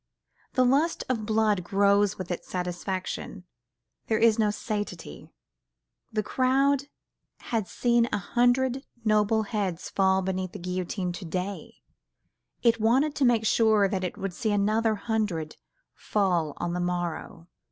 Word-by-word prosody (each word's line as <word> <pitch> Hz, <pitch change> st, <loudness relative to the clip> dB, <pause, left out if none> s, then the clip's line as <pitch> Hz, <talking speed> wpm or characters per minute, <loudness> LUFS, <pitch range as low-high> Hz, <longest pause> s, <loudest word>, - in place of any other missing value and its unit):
The 255 Hz, -1 st, +3 dB
lust 285 Hz, +7 st, +2 dB
of 225 Hz, -4 st, -1 dB
blood 215 Hz, -4 st, +2 dB
grows 200 Hz, +2 st, +2 dB
with 185 Hz, -1 st, -6 dB
its 175 Hz, -, -5 dB
satisfaction, 180 Hz, +1 st, -4 dB, 0.6 s
there 220 Hz, -, +2 dB
is 225 Hz, 0 st, +4 dB
no 215 Hz, -1 st, +3 dB
satiety: 205 Hz, -, -5 dB, 0.8 s
the 215 Hz, -1 st, -1 dB
crowd 270 Hz, +3 st, +2 dB, 0.7 s
had 220 Hz, -4 st, 0 dB
seen 240 Hz, -1 st, +2 dB
a -, -, +1 dB
hundred 245 Hz, +6 st, +1 dB, 0.2 s
noble 215 Hz, +1 st, +3 dB
heads 200 Hz, -5 st, -3 dB
fall 190 Hz, -1 st, +2 dB
beneath 185 Hz, -1 st, -3 dB
the -, -, -6 dB
guillotine 180 Hz, 0 st, -3 dB
to 175 Hz, +1 st, -7 dB
day, 185 Hz, +4 st, -5 dB, 0.8 s
it 230 Hz, -2 st, +3 dB
wanted 265 Hz, +7 st, +3 dB
to 280 Hz, -, +1 dB
make 235 Hz, -3 st, +3 dB
sure 220 Hz, -3 st, +4 dB
that 190 Hz, -1 st, -2 dB
it 180 Hz, -, -4 dB
would 195 Hz, -2 st, -4 dB
see 220 Hz, +3 st, -1 dB
another 215 Hz, +2 st, +2 dB
hundred 205 Hz, -8 st, -2 dB, 0.4 s
fall 175 Hz, -7 st, 0 dB
on 175 Hz, 0 st, -2 dB
the 180 Hz, -, -2 dB
morrow. 175 Hz, -1 st, -3 dB
205 Hz, 140 wpm, -27 LUFS, 185-230 Hz, 0.8 s, is